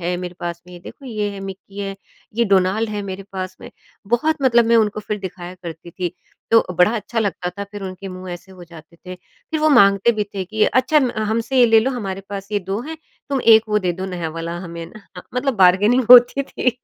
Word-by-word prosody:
है, 175 +1 -2
मेरे 180 0 -6
पास 170 0 -5
में 180 -1 -12
देखो 275 - -12
ये 210 -3 -2
है 200 -1 -8
मिक्की 195 +1 -9
है, 195 -1 -4 0.4
ये 235 - +2
डोनाल्ड 200 +2 +2
है 210 - -3
मेरे 195 0 -6
पास 185 -1 -5
में। - - -10 0.4
बहुत 275 +8 +1
मतलब 235 -3 +4
मैं 230 0 +4
उनको 215 -1 +1
फिर 210 0 -4
दिखाया 185 -2 -8
करती 170 0 -9
थी। 180 0 -4 0.4
तो 225 0 +5
बड़ा 180 +6 +3
अच्छा 225 +2 -4
लगता 190 -4 -1
था। 200 - -3
फिर 205 -1 -7
उनके 190 +1 -7
मुँह 185 0 -8
ऐसे 180 +2 -10
हो 180 -1 -12
जाते 170 0 -15
थे, 185 +1 -9
फिर 310 - -8
वो 310 - +4
माँगते 200 -3 +5
भी 210 -1 -1
थे 190 - -3
कि 215 +3 +1
अच्छा 260 +4 +3
म 255 -3 +1
हमसे 225 +4 -1
ये 240 - +7
ले 225 -1 +5
लो, 260 +4 0
हमारे 195 -6 -4
पास 200 0 -6
ये 205 - +2
2 195 +4 -4
हैं, 320 +3 -7 0.3
तुम 275 -2 0
1 220 -1 +6
वो 210 0 +2
दे 180 -3 -1
दो 185 +2 -5
नया 175 -3 -4
वाला 170 +1 -4
हमें 170 -2 -7
ना। 215 - -14 0.3
मतलब 260 0 0
बार्गेनिंग 205 +7 +4
होती 250 +3 +8
थी। 260 -2 -1
200 Hz, 230 wpm, -20 LUFS, 180-230 Hz, 0.4 s, होती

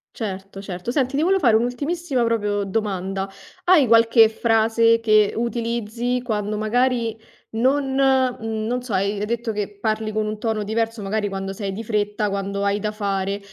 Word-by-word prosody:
Certo, 195 -2 -6
certo, 185 +1 -6
senti 260 0 0
ti 290 - +1
volevo 380 +4 +3
fare 240 -9 +4
un'ultimissima 265 +4 0
proprio 210 -3 0
domanda: 195 -1 -2 0.4
hai 350 -6 +6
qualche 230 0 +6
frase 225 +1 +3
che 215 -2 +3
utilizzi 235 +1 -2
quando, 210 -3 -2
magari 235 +1 +1 0.4
non 265 +4 +1
mhmm, 255 -5 +1
non 245 +3 -1
so, 245 -3 -6
hai 200 +2 0
hai 205 - -1
detto 235 0 -2
che 205 -1 -4
parli 215 0 -1
con 215 0 -1
un 215 0 -4
tono 220 -1 -1
diverso, 225 +1 -2
magari 205 +1 -1
quando 195 0 -4
sei 195 0 -4
di 210 +4 -5
fretta, 210 -1 -1
quando 200 0 -3
hai 200 +1 +1
da 210 0 -2
fare. 200 -1 -2
220 Hz, 170 wpm, -22 LUFS, 205-235 Hz, 0.4 s, hai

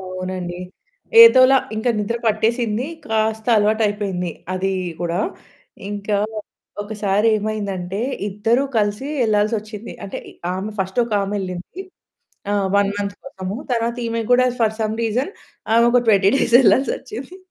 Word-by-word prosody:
అవునండి, 185 -1 -5 0.6
ఏదోలా 270 - +8 0.2
ఇంకా 240 +3 +1
నిద్ర 210 +3 -1
పట్టేసింది. 225 +2 0 0.2
కాస్త 220 0 -1
అలవాటు 215 +2 +2
అయిపోయింది 195 -4 -2 0.2
అది 195 +1 -1 0.3
కూడా. 170 0 -1 0.7
ఇంకా 205 0 -2 0.7
ఒకసారేమైందంటే, 205 -2 -1 0.3
ఇద్దరు 225 +6 +1
కలిసి 210 +5 0 0.2
వెళ్ళాల్సొచ్చింది. 215 0 -1
అంటే, 195 - -6
ఇ - - -15 0.2
ఆమె 195 +3 -4
ఫస్ట్ 190 +4 -2
ఒక 230 - -8
ఆమెళ్ళింది, 195 - -5 0.7
ఆ! 205 - +1 0.2
1 200 0 +3
మంత్ 200 0 -3
కోసము. 195 -5 -6 0.2
తరువాత 235 0 0
ఈమె 230 0 -2
కూడా 255 +1 +5
ఫర్ 220 -1 +1
సమ్ 215 0 -1
రీజన్ 250 - -1 0.4
ఆమె 235 0 +5
ఒక 245 -1 +4
20 200 -2 +5
డేస్ 235 - +1
వెళ్ళాల్సొచ్చింది. 265 - 0
210 Hz, 125 wpm, -20 LUFS, 195-230 Hz, 0.7 s, ఏదోలా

